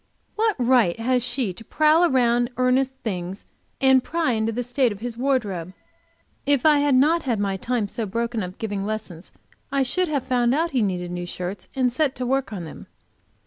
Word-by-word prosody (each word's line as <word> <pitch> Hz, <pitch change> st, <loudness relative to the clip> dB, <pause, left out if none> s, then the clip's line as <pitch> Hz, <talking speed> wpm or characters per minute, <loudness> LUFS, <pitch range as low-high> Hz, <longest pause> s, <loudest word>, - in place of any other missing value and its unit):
What 440 Hz, 0 st, +1 dB
right 240 Hz, -7 st, +3 dB
has 250 Hz, +1 st, +1 dB
she 240 Hz, -5 st, -1 dB
to 225 Hz, -, -11 dB
prowl 310 Hz, +6 st, +3 dB
round 240 Hz, -2 st, +2 dB
among 255 Hz, 0 st, +2 dB
Ernest's 265 Hz, +1 st, +1 dB
things 185 Hz, -2 st, -4 dB, 0.3 s
and 265 Hz, -1 st, +5 dB
pry 330 Hz, -5 st, 0 dB
into 220 Hz, -1 st, 0 dB
the 245 Hz, +2 st, -3 dB
state 245 Hz, 0 st, +1 dB
of 205 Hz, -, -7 dB
his 235 Hz, +1 st, -5 dB
wardrobe? 215 Hz, -9 st, -1 dB, 0.7 s
If 285 Hz, -2 st, +2 dB
I 300 Hz, -2 st, +6 dB
had 285 Hz, -2 st, +3 dB
not 310 Hz, +6 st, +4 dB
had 240 Hz, -8 st, -1 dB
my 200 Hz, -1 st, 0 dB
time 230 Hz, +2 st, -1 dB
so 220 Hz, +2 st, -4 dB
broken 230 Hz, +2 st, -2 dB
up 180 Hz, -1 st, -5 dB
with -, -, -32 dB
giving 205 Hz, -3 st, -3 dB
lessons, 205 Hz, -5 st, -6 dB, 0.4 s
I 275 Hz, -1 st, +2 dB
should 365 Hz, +8 st, +1 dB
have 285 Hz, -5 st, -1 dB
found 245 Hz, 0 st, +1 dB
out 330 Hz, +3 st, 0 dB
that -, -, -9 dB
he 250 Hz, -, +3 dB
needed 180 Hz, -3 st, -2 dB
new 175 Hz, 0 st, -4 dB
shirts 180 Hz, +2 st, -6 dB
and 255 Hz, -2 st, +1 dB
set 280 Hz, 0 st, +1 dB
to 250 Hz, -, -4 dB
work 270 Hz, 0 st, 0 dB
on 185 Hz, -5 st, -5 dB
them. 155 Hz, -, -11 dB
245 Hz, 210 wpm, -23 LUFS, 205-270 Hz, 0.7 s, I